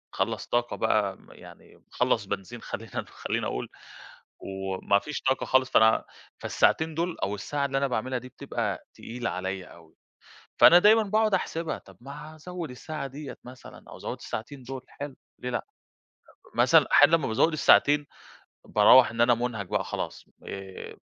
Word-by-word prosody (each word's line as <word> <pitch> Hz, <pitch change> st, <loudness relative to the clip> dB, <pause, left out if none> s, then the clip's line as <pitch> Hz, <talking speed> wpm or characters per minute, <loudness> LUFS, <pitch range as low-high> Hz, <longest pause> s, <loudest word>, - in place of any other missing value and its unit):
خلّص -, -, -2 dB
طاقة 120 Hz, 0 st, 0 dB
بقى 105 Hz, -3 st, +1 dB
م -, -, -20 dB
يعني -, -, -15 dB
وخلّص -, -, -1 dB
بنزين 100 Hz, +4 st, -6 dB
خلّينا 110 Hz, -3 st, -6 dB
خلّيني -, -, -3 dB
أقول -, -, -4 dB, 0.7 s
وما 95 Hz, +1 st, -1 dB
فيش 150 Hz, +4 st, -6 dB
طاقة 130 Hz, -, 0 dB
خالص، 130 Hz, 0 st, +2 dB
فأنا 110 Hz, -2 st, +4 dB, 0.3 s
فالساعتين 160 Hz, 0 st, +1 dB
دُول 170 Hz, +1 st, -2 dB
أو 100 Hz, +2 st, -1 dB
الساعة 140 Hz, +7 st, -2 dB
اللي 135 Hz, -1 st, -1 dB
أنا 140 Hz, 0 st, +1 dB
باعملها 125 Hz, +1 st, -2 dB
دي 130 Hz, +1 st, -11 dB
بتبقى 115 Hz, -7 st, -4 dB
تقيلة 120 Hz, 0 st, -5 dB
عليّا 95 Hz, 0 st, -4 dB
أوي. 80 Hz, -2 st, -17 dB, 0.6 s
فأنا 175 Hz, +2 st, +9 dB
دايمًا 220 Hz, +3 st, +6 dB
باقعُد 215 Hz, +1 st, +1 dB
أحسبها، 165 Hz, -3 st, -1 dB
طَب 95 Hz, -2 st, -18 dB
ما 140 Hz, +4 st, -10 dB
هازوِّد 175 Hz, 0 st, -7 dB
الساعة 140 Hz, +3 st, -6 dB
ديّة 140 Hz, +1 st, -9 dB
مثلًا 125 Hz, +1 st, -13 dB
أو -, -, -10 dB
أزوِّد -, -, -5 dB
الساعتين 130 Hz, +4 st, -7 dB
دُول 130 Hz, +1 st, -7 dB
حلو 140 Hz, -1 st, -8 dB, 0.2 s
ليه 125 Hz, -, -4 dB
لأ؟ 120 Hz, -, -3 dB, 0.9 s
مثلًا -, -, +5 dB
أحيانًا 165 Hz, -, +7 dB
لمّا 150 Hz, -, -3 dB
بازوِّد 115 Hz, +9 st, +2 dB
الساعتين، 145 Hz, -1 st, +4 dB, 0.6 s
باروَّح 110 Hz, +4 st, +6 dB
إن 115 Hz, -, -5 dB
أنا 120 Hz, +1 st, +5 dB
مُنهَك 115 Hz, -4 st, -3 dB
بقى -, -, -1 dB
خلاص، -, -, -5 dB, 0.2 s
آآ 95 Hz, -1 st, -8 dB
125 Hz, 160 wpm, -27 LUFS, 110-150 Hz, 0.9 s, فأنا